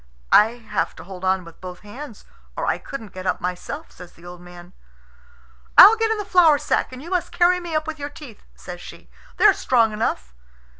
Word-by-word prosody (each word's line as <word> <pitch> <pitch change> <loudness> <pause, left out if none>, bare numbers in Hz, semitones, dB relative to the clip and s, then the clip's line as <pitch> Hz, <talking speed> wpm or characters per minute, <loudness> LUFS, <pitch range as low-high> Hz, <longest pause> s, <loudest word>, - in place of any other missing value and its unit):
"I 220 +2 +6
have 230 -3 -4
to - - -11
hold 185 0 -11
on 190 -1 0
with 170 -1 -15
both 180 -1 -9
hands, 225 +2 -11 0.3
or - - -2
I - - -1
couldn't 225 -8 -9
get 185 0 -7
up 185 - -1
myself," 180 - -6
says 180 -1 -14
the 170 - -18
old 175 0 -11
man. 175 0 -14 1.0
"I'll 420 +4 +10
get 450 0 0
in 445 - 0
the 415 - -5
flour 345 -6 +5
sack, - - -1
and 255 +2 -10
you 340 - -10
must 360 -2 -1
carry 360 +1 +3
me 340 -2 -6
up 310 0 0
with 315 -1 -6
your 285 0 -5
teeth," 290 -7 -13
says 175 -1 -10
she; - - -13 0.3
"they're 415 -2 +6
strong 230 -9 +1
enough." 65 - -3
230 Hz, 210 wpm, -22 LUFS, -, 1.0 s, I'll